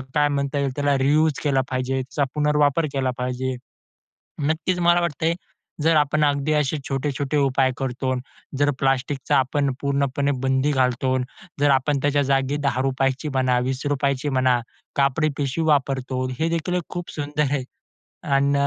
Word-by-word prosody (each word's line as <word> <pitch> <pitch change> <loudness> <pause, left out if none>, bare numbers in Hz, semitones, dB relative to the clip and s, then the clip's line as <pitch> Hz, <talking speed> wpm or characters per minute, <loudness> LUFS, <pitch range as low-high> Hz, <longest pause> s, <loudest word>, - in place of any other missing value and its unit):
काय 145 0 +4
म्हणता 140 0 -1
येईल, 140 -2 0
त्याला 145 -1 +1
रियुज 150 +4 +3
केला 135 -3 +2
पाहिजे, 130 +1 -1
त्याचा 140 +2 -2
पुनर्वापर 150 +1 +2
केला 130 -2 0
पाहिजे. 125 +1 -2 0.9
नक्कीच, 165 +3 0
मला 175 0 +4
वाटतयं, 165 0 0 0.5
जर 160 0 +4
आपण 150 +1 +3
अगदी 145 +1 +1
असे 150 0 +1
छोटे-छोटे 140 +1 -2
उपाय 135 -2 +2
करतो. 130 0 -2 0.4
जर 145 0 +3
प्लास्टिकचा 135 0 0
आपण 135 +1 +1
पूर्णपणे 140 0 0
बंदी 135 +2 +2
घालतो, 130 -1 +1 0.4
जर 145 0 +4
आपण 135 +2 +2
त्याच्या 145 0 +2
जागी 135 +1 +1
₹10ची 135 +2 0
म्हणा, 130 -3 +1
₹20ची 140 +1 -1
म्हणा, 130 -2 +2 0.4
कापडी 140 +3 +2
पिशवी 145 +3 -1
वापरतो. 135 -3 +1
हेदेखील 165 +2 -1
एक 180 - -1
खूप 175 -1 -5
सुंदर 150 0 -2
आहे. 140 -2 0 0.6
आणि 140 0 +2
140 Hz, 140 wpm, -23 LUFS, 130-150 Hz, 0.9 s, काय